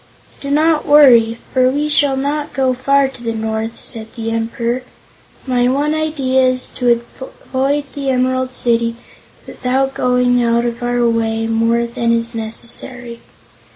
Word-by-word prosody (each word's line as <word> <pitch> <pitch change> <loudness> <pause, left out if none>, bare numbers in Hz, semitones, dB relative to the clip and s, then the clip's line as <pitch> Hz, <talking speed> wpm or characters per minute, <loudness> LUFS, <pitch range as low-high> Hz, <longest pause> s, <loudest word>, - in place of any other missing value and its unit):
"Do 280 - -5
not 310 +2 +2
worry, 240 -6 +6 0.2
for 255 -1 +4
we 290 +3 -1
shall 285 -2 +2
not 290 +2 -2
go 265 -1 +1
far 275 +2 +2
to 265 -2 -12
the 230 -1 -3
north," 220 +1 -3
said 220 -1 -3
the 225 -1 -4
Emperor. 230 +2 -2 0.6
"My 245 -2 +1
one 285 +4 +1
idea 295 -4 0
is 255 0 +1
to 240 -2 +1 0.4
avoid 275 +2 0
the 280 -1 -3
Emerald 255 0 0
City 235 -2 0 0.5
without 265 +2 -1
going 250 -1 +2
out 235 0 +1
of 235 0 -3
our 245 0 +1
way 225 -1 0
more 230 +1 +1
than 235 0 -1
is 230 0 -1
necessary. 235 +2 -4
250 Hz, 150 wpm, -17 LUFS, 230-270 Hz, 0.6 s, worry